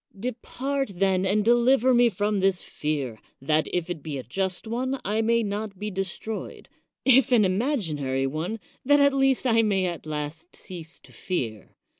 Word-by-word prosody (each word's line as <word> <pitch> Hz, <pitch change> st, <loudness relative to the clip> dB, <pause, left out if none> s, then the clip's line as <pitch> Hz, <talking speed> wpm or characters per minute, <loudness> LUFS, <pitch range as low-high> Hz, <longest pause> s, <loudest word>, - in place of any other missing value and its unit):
Depart, 255 Hz, +2 st, -3 dB
then, 190 Hz, 0 st, +2 dB
and 205 Hz, +2 st, +1 dB
deliver 245 Hz, +2 st, +4 dB
me 240 Hz, 0 st, +5 dB
from 205 Hz, 0 st, 0 dB
this 190 Hz, -1 st, +2 dB
fear 140 Hz, -7 st, -3 dB
— -, -, -40 dB
that, 155 Hz, +3 st, +1 dB
if 175 Hz, -2 st, -1 dB
it 175 Hz, -4 st, -5 dB
be 145 Hz, -1 st, -5 dB
a 130 Hz, -, -5 dB
just 190 Hz, -, -3 dB
one, 255 Hz, +4 st, -2 dB
I 215 Hz, +3 st, +1 dB
may 230 Hz, +1 st, +2 dB
not 205 Hz, -1 st, -4 dB
be 210 Hz, +2 st, -4 dB
de 195 Hz, 0 st, -1 dB
stroyed; 210 Hz, +3 st, -6 dB, 0.4 s
if 265 Hz, -1 st, +6 dB
an 225 Hz, -4 st, +5 dB
imaginary 170 Hz, -, 0 dB
one, 160 Hz, +11 st, -3 dB, 0.2 s
that 290 Hz, +2 st, +5 dB
at 280 Hz, 0 st, +5 dB
least 270 Hz, -1 st, +2 dB
I 230 Hz, -2 st, +4 dB
may 200 Hz, -4 st, +1 dB
at 170 Hz, -3 st, -4 dB
last 155 Hz, +3 st, -5 dB
cease 170 Hz, -3 st, -7 dB
to -, -, -18 dB
fear. 115 Hz, -, -4 dB
195 Hz, 180 wpm, -26 LUFS, 165-235 Hz, 0.4 s, if